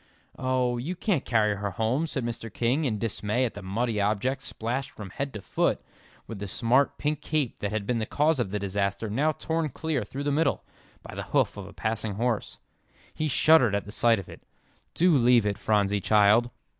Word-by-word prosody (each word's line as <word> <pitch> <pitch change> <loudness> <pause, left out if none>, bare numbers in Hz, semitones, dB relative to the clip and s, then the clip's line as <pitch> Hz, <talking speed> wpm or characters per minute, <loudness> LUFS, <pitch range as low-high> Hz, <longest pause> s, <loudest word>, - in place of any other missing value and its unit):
"Oh, 130 -1 0
you 160 +9 -3
can't 180 - 0
carry 105 -3 +2
her 100 0 -2
home," 115 - 0
said 135 -5 -3
Mr. 115 -1 -5
King, 125 +9 0
in 110 -5 0
dismay 110 +2 0
at 120 - -3
the 100 - -8
muddy 105 +3 -1
object 110 +7 0
splashed 130 +2 -3
from 100 -8 -10
head 140 +5 -3
to 105 - -5
foot, - - 0 0.4
with 110 -3 -8
the 100 - -5
smart 125 +7 +2
pink 150 0 -1
cape 150 -6 -1
that 100 - -2
had 110 -2 -2
been 120 +1 0
the 110 - -2
cause 150 0 +2
of 120 - 0
the 105 - -2
disaster, 100 +1 -2
now 145 +8 +2
torn 160 +1 -2
clear 150 -2 -2
through 135 +7 -6
the 145 - 0
middle, 145 +1 +1 0.4
by - - -10
the - - -4 0.2
hoof - - +2
of 100 -2 -8
a - - -11
passing 110 +2 -2
horse. 115 0 -1 0.6
He 155 - -1
shuddered 145 -7 +5
at 100 - -2
the 105 - -9
sight 115 +1 +3
of 95 - -7
it. - - -12 0.5
"Do 175 -1 +4
leave 120 -3 +5
it, 100 0 -1
Phronsie, 100 -2 +1
child." 110 +4 +4
115 Hz, 205 wpm, -27 LUFS, 105-135 Hz, 0.6 s, shuddered